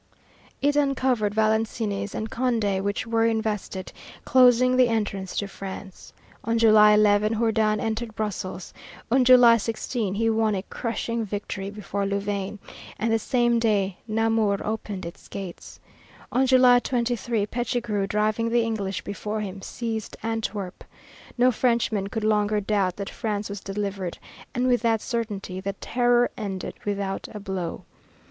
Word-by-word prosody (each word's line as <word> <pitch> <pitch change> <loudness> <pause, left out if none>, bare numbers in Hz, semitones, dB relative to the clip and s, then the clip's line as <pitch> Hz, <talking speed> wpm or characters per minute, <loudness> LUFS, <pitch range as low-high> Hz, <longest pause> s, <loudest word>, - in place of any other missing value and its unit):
It 290 0 +3
uncovered 260 -7 +1
Valenciennes 215 -2 0
and 220 - -3
Condé, 225 -5 0
which 200 +2 -2
were 225 0 +2
invested, 215 -4 -2 0.3
closing 255 0 +5
the 255 -1 +5
entrance 205 -4 -2
to 200 - -1
France. 195 -1 -9 0.3
On 230 +1 0
July 215 -2 +7
11, 210 +1 +4
Jourdan 220 -2 +2
entered 225 0 -3
Brussels; 190 -4 -4 0.4
on 260 +1 +5
July 245 -2 +7
16, 220 -2 -2
he 225 +2 +1
won 220 -1 +2
a 190 - -3
crushing 230 +1 -3
victory 200 -1 -4
before 200 -1 -3
Louvain 200 0 -2 0.4
and 225 +2 0
the 225 - +3
same 240 +1 +2
day 200 -5 +1
Namur 220 -2 +1
opened 210 -3 -4
its 170 - -10
gates. 190 -3 -8 0.5
On 260 +2 +2
July 255 -1 +6
23, 240 -3 -1
Pichegru, 235 -3 -2
driving 215 +2 0
the 235 0 +3
English 205 -4 -3
before 210 +2 -4
him, 195 -1 -6
seized 225 0 -5
Antwerp. 220 -4 -3 0.5
No 250 +1 +5
Frenchman 230 -4 +1
could 215 +2 -4
longer 210 -1 +2
doubt 195 -3 0
that 200 -1 -5
France 210 -3 -3
was 200 0 -5
delivered, 195 -2 -4 0.4
and 250 +1 +1
with 245 -2 +3
that 225 -1 +2
certainty 205 -6 -4
the 195 +1 -3
Terror 245 +3 +2
ended 200 -5 -4
without 200 -1 -2
a - - -4
blow. 190 -4 -4
215 Hz, 140 wpm, -25 LUFS, 200-230 Hz, 0.5 s, July